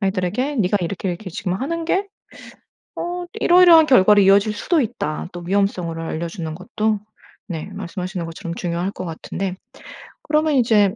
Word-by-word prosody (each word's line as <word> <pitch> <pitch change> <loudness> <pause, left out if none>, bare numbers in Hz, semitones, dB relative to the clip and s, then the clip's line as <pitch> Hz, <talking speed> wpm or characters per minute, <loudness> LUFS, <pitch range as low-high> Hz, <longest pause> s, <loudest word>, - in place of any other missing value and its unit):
아이들에게 200 +8 -1
"네가 205 -2 +2
이렇게 185 +2 -3
이렇게 185 +3 -5
지금 180 +2 -3
하는 325 - -3
게 385 +4 0 0.9
어 355 +1 -4 0.2
이러이러한 350 -5 +7
결과로 210 -6 +6
이어질 200 +2 +5
수도 310 - +1
있다." 195 -9 -3
또 175 - -7
위험성을 180 -3 -1
알려주는 165 0 -4
것도 210 +4 -1 0.5
네 170 +1 -5
말씀하시는 185 -1 -5
것처럼 165 +1 -6
중요할 175 +1 -2
것 185 - -7
같은데 180 +3 -4 0.7
그러면 305 0 +1
이제 215 -5 +3
195 Hz, 360 characters per minute, -21 LUFS, 175-250 Hz, 0.9 s, 이러이러한